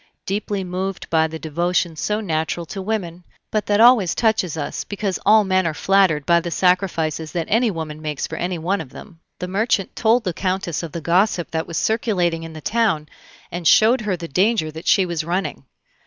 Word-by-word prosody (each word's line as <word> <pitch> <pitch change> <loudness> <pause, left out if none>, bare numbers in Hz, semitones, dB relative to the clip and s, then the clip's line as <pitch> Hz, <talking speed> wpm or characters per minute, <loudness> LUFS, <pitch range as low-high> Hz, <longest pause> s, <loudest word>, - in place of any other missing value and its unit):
Deeply 200 0 -2
moved 185 +1 -4
by 160 -1 +3
the 160 0 -7
devotion 170 +2 -1
so 210 +6 -1
natural 165 -3 -2
to 195 +4 -6
women, 185 -4 -3 0.3
but 215 -1 -1
that 205 0 +2
always 230 -6 +6
touches 215 -8 +1
us, 145 - -3
because 200 -2 -3
all 215 +1 +7
men 185 -2 +1
are 155 - -2
flattered 185 -6 +2
by 170 0 +4
the 170 0 -4
sacrifices 165 -4 0
that 170 -2 -1
any 230 +2 +3
woman 160 -4 -5
makes 150 -2 -3
for - - -6
any 175 0 -2
one 180 +3 -1
of 150 - -9
them, 165 +5 -13 0.2
the 180 - -5
merchant 200 0 0
told 230 +1 +3
the 180 -4 -2
Countess 185 -2 -2
of 165 -3 -6
the 170 - -5
gossip 175 +2 +1
that 160 0 -2
was 165 - -4
circulating 185 -7 0
in 165 0 -8
the 155 - -9
town, 205 -7 0 0.4
and 175 -1 -2
showed 235 +4 +5
her 205 -4 -1
the 170 -1 -6
danger 185 +1 +1
that 160 +2 -9
she 190 - +4
was 170 -3 -2
running. 175 -4 -3
180 Hz, 200 wpm, -21 LUFS, 165-205 Hz, 0.4 s, all